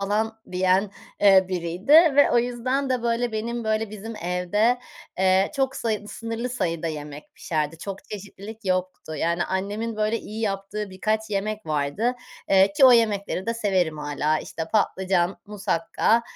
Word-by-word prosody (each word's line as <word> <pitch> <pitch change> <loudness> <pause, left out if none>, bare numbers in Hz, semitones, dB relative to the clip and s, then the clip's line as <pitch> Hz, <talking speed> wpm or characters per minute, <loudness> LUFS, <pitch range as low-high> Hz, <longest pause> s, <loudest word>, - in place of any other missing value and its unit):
falan 220 +3 -1
diyen, 185 +2 +2 0.3
eee, 195 -2 +7
biriydi 180 - -2
ve 310 -3 +7
o 240 - +4
yüzden 255 +3 -1
de 250 -2 0
böyle 235 0 0
benim 230 +2 -3
böyle 220 0 0
bizim 215 +2 -7
evde, 205 +6 +1 0.4
eee, 190 +1 +3
çok 270 -1 0
sayı 215 -2 -2
sınırlı 230 +2 -4
sayıda 170 -9 -2
yemek 150 -2 -7
pişerdi. 155 0 -2
Çok 195 +2 -7
çeşitlilik 210 +2 -9
yoktu. 185 -3 -2
Yani 170 +2 0
annemin 205 +4 -3
böyle 215 +2 0
iyi 220 0 -8
yaptığı 200 0 -3
birkaç 215 +3 -2
yemek 210 +1 -2
vardı, 155 - 0 0.4
eee, 195 0 +5
ki 265 - +5
o 255 - +9
yemekleri 205 -5 +1
de 230 - 0
severim 185 -8 0
hâlâ. 150 +1 0
İşte 160 - -5
patlıcan, 190 -3 +1
musakka, 210 +3 +1
205 Hz, 150 wpm, -24 LUFS, 185-225 Hz, 0.4 s, o